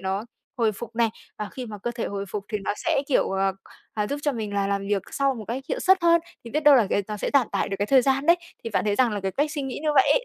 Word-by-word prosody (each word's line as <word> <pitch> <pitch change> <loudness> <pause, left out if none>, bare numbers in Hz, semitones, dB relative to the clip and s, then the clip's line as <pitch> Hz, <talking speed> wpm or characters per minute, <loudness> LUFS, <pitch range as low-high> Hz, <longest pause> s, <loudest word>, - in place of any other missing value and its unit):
nó 190 +2 -2 0.3
hồi 225 -3 +2
phục 230 +3 -9
này. 235 -1 +3 0.3
Và 210 - -3
khi 255 -2 -6
mà 210 -2 -7
cơ 240 - -1
thể 235 -1 -3
hồi 200 0 -4
phục 200 +1 -4
thì 210 - 0
nó - - 0
sẽ, 275 - 0
kiểu, 275 - +2
ờ, 195 0 +1 0.4
ờ, 210 -1 0
giúp 285 +6 -3
cho 290 - +1
mình 215 -4 -4
là 200 -1 +1
làm 200 0 -1
việc 200 -2 +1
sau 275 -1 +1
một 225 -3 -7
cách 250 +4 -3
hiệu - - -2
suất 380 -1 +4
hơn. 335 0 +5 0.2
Thì 230 - -8
biết 300 - 0
đâu 295 -2 +8
cái 200 - +2
nó 210 - -3
sẽ - - -2
giảm 275 -4 +4
tải - - 0
được 195 - -3
cái 205 - 0
thời 265 +2 +5
gian 270 +2 +1
đấy. 340 +1 +7 0.3
Thì 230 - -3
bạn - - 0
thấy 205 -1 +1
rằng 245 0 +3
là 205 - -2
cái 190 0 -2
cách 295 +6 0
suy 295 -2 -3
nghĩ 270 -2 -4
như 310 - 0
vậy 270 - +5
ấy, - - +1
230 Hz, 315 wpm, -25 LUFS, 205-275 Hz, 0.4 s, đâu